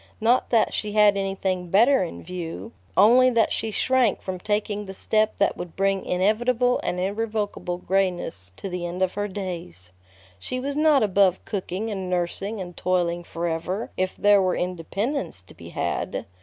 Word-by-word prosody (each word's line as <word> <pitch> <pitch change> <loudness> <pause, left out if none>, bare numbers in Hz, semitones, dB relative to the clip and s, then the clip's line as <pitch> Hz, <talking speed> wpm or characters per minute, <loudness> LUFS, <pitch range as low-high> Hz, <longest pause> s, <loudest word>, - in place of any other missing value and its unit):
Not 235 +3 +3
that 230 -3 +3
she 210 -1 -2
had 210 -1 +5
anything 195 -2 -2
better 235 +9 +5
in 175 - -7
view, 180 +4 -6 0.3
only 245 +6 +7
that 230 -3 +2
she 225 - -1
shrank 250 0 +2
from 185 -1 -5
taking 205 +1 -2
the 190 - -7
step 215 +2 +1
that 200 - +2
would 175 -2 -7
bring 195 0 +1
inevitable 240 +7 +2
and 180 - -2
irrevocable 205 -2 -2
grayness 180 - -1
to - - -5
the 180 -2 -4
end 180 +2 -2
of 185 - 0
her 205 0 -2
days. 170 - -5 0.5
She 255 - -4
was 280 +2 -3
not 300 -4 +4
above 195 -2 +3
cooking 200 +2 -3
and 190 -3 -4
nursing 185 +4 -2
and 175 -2 -7
toiling 175 -1 0
forever 170 +5 -3
if 185 0 -1
there 205 -1 +5
were 185 -1 +1
independence 185 - -2
to - - -16
be - - -11
had. - - -2
195 Hz, 170 wpm, -24 LUFS, 180-215 Hz, 0.5 s, only